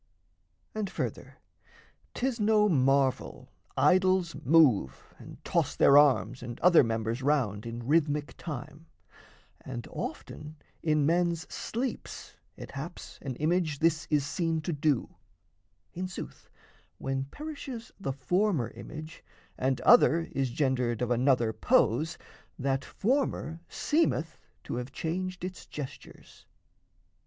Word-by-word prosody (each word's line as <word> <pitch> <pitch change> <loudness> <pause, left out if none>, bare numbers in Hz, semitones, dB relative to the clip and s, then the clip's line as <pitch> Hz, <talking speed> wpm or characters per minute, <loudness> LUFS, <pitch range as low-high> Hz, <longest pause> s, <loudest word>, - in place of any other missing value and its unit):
And 215 -3 -2
further, - - -5 0.8
'tis 255 -1 -1
no 210 0 +4
marvel 135 -5 +1 0.3
idols 185 -2 +3
move 130 - +3
And - - -11
toss - - 0
their 140 - +6
arms 130 -4 +4
and 120 -1 -7
other 175 -3 +7
members 115 +1 -2
round 125 -7 0
In 115 0 -6
rhythmic 150 0 +1
time 155 +1 -8 0.8
and 120 -3 -6
often 150 0 -6 0.3
in 150 -2 +2
men's 170 +1 +2
sleeps 245 +3 -5 0.2
It - - -9
haps 150 +5 -8
an 130 -3 -5
image 155 +1 0
this 165 +1 +1
is 150 -3 +2
seen 165 +1 -1
to 165 +2 -3
do; 145 -3 0 0.8
In 185 +2 -3
sooth, 185 - -9 0.5
when 135 0 -2
perishes 275 - -7
the 180 -8 -2
former 140 - 0
image, 155 +5 -10 0.3
And 130 0 0
other 170 -8 +6
is 135 -2 -1
gendered 125 -3 0
of 125 - -1
another 120 -2 +2
pose, 170 - +2 0.4
That 135 0 -1
former 215 - -1
seemeth 295 - 0 0.2
to - - -4
have 125 +2 -5
changed 185 +4 -4
its 185 -2 -8
gestures. 145 -3 -10
150 Hz, 120 wpm, -29 LUFS, 130-180 Hz, 0.8 s, other